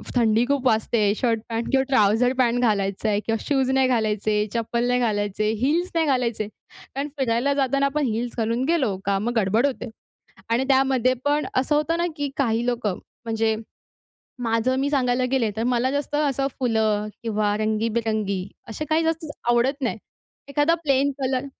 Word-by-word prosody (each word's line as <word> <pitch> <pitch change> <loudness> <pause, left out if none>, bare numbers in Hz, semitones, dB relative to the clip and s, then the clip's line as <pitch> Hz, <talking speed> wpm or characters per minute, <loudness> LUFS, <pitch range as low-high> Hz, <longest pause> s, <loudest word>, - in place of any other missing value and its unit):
थंडी 230 -1 +3
खूप 275 0 -1
वाजते. 220 -2 +2
शर्ट-पॅन्ट 230 0 -1
किंवा 265 -1 +3
ट्राउझर 240 0 +3
पॅन्ट 245 -1 +2
घालायचा 200 -2 0
आहे 205 -1 +1
किंवा 225 0 0
शूज 270 -3 +1
नाही 265 0 +3
घालायचे, 215 -3 +1
चप्पल 235 +1 -1
नाही 250 0 +2
घालायचे, 210 -2 0
हील्स 320 +9 +1
नाही 330 -1 +3
घालायचे 235 -6 0 0.3
कारण 275 +2 -6
फिरायला 255 +2 +1
जाताना 275 0 +1
आपण 285 +1 0
हिल्स 235 +1 -2
घालून 230 +2 0
गेलो 275 - +1
का 200 0 +1
मग 235 +4 -2
गडबड 215 +4 +2
होते. 260 -3 -3 0.6
आणि 235 +3 +1
त्यामध्ये 265 -2 +3
पण 290 +1 +1
असं 260 +3 +2
होतं 305 +2 +1
ना, 345 - +1
की 290 -2 -2
काही 235 -4 +1
लोकं 230 -6 -1 0.3
म्हणजे, 225 -1 0 0.9
माझं 230 +2 +1
मी 280 +1 0
सांगायला 255 -3 +1
गेले, 240 -5 +1
तर 225 - 0
मला 250 +1 +1
जास्त 285 +1 -2
असं 280 -2 +1
फुलं 220 -4 +1 0.2
किंवा 210 -2 0
रंगीबेरंगी 215 -3 -1 0.2
असे 265 +7 -4
काही 315 +1 +2
जास्त 325 0 -1 0.2
आवडत 255 +4 +2
नाही. 240 -3 -1 0.5
एखादा 290 +4 +2
प्लेन 280 -1 +2
कलर, 260 0 0
245 Hz, 165 wpm, -23 LUFS, 220-270 Hz, 0.9 s, थंडी